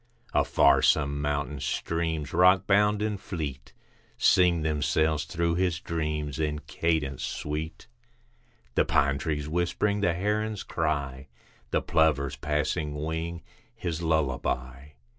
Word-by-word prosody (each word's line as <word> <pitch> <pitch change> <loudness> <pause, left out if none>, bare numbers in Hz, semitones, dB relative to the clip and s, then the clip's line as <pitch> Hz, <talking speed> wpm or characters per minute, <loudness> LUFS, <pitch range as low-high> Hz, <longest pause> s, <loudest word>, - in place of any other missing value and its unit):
Afar - - +4
some 70 +1 +2
mountain 75 0 -2
streams, 80 +2 -2
rockbound 100 +4 +4
and 105 -3 -3
fleet, 70 -7 -5 0.5
Sing 90 -3 +4
themselves 75 0 +1
through 85 +1 -1
his 90 -1 0
dreams 75 -4 -3
in 75 -1 0
cadence 75 -2 -1
sweet, 75 +2 -4 0.9
The - - +3
pine 70 -4 +2
trees 75 -2 -2
whispering, 90 +5 0
the 90 -4 +2
heron's 105 +3 -1
cry, 70 -3 -2 0.4
The - - 0
plover's 75 -3 +2
passing 75 +1 -1
wing, 80 +3 -4 0.3
his 85 -6 -4
lullaby. 65 -3 -1
80 Hz, 110 wpm, -27 LUFS, 75-85 Hz, 0.9 s, Afar